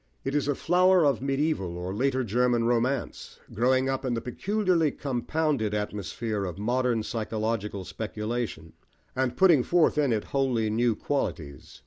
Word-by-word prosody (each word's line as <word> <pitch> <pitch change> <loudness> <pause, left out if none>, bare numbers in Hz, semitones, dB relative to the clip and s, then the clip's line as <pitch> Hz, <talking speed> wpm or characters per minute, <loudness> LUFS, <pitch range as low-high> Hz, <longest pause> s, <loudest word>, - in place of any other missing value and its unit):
It 135 - -3
is 145 -1 0
a 145 - +1
flower 180 +1 +4
of 140 -4 +2
medieval 135 - -1
or 90 +2 -4
later 130 +4 0
German 120 +1 +1
romance, 120 +2 -1 0.2
growing 130 +4 +2
up 135 0 -2
in 125 -2 -1
the - - -1
peculiarly 180 - 0
compounded 135 -4 -1
atmosphere 105 +1 -3
of 90 -3 -5
modern 120 +1 0
psychological 110 -3 -3
speculation, 105 -3 -4 0.4
and 130 -1 -1
putting 175 -8 +6
forth 165 +2 +2
in 140 -4 +2
it 110 -2 0
wholly 125 -6 +1
new 115 +1 +2
qualities. 85 - -4
120 Hz, 145 wpm, -27 LUFS, 105-140 Hz, 0.4 s, putting